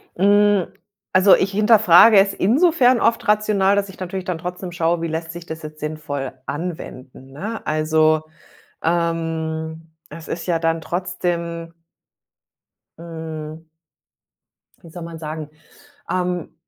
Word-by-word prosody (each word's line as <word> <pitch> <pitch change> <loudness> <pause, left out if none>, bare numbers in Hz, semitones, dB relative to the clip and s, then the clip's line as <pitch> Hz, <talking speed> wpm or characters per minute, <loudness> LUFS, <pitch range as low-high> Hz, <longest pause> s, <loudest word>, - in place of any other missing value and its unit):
Mhm. 205 0 +3 0.5
Also, 190 +1 +7
ich 195 - 0
hinterfrage 210 -1 +6
es 195 0 +3
insofern 255 - +3
oft 230 - +1
rational, 210 -2 +3
dass 200 -1 -1
ich 190 - -13
natürlich 185 0 -5
dann 180 -3 -2
trotzdem 180 +2 -6
schaue, 170 0 0
wie 165 - -1
lässt 160 0 -4
sich 170 0 -9
das 160 0 -7
jetzt 155 0 -9
sinnvoll 150 -3 -4
anwenden, 135 -5 -7
ne? 205 +11 -6
Also, 155 0 +2 0.6
ähm, 165 -1 -2 0.2
es 160 +2 -10
ist 165 - -5
ja 170 -2 0
dann 165 0 0
trotzdem 170 -1 -3 1.3
hm 160 -1 -8 1.1
wie 170 - -14
soll 175 +1 -9
man 165 -1 -8
sagen? 155 -1 -6 0.6
Ähm, 180 -2 -2
170 Hz, 125 wpm, -21 LUFS, 160-190 Hz, 1.3 s, Also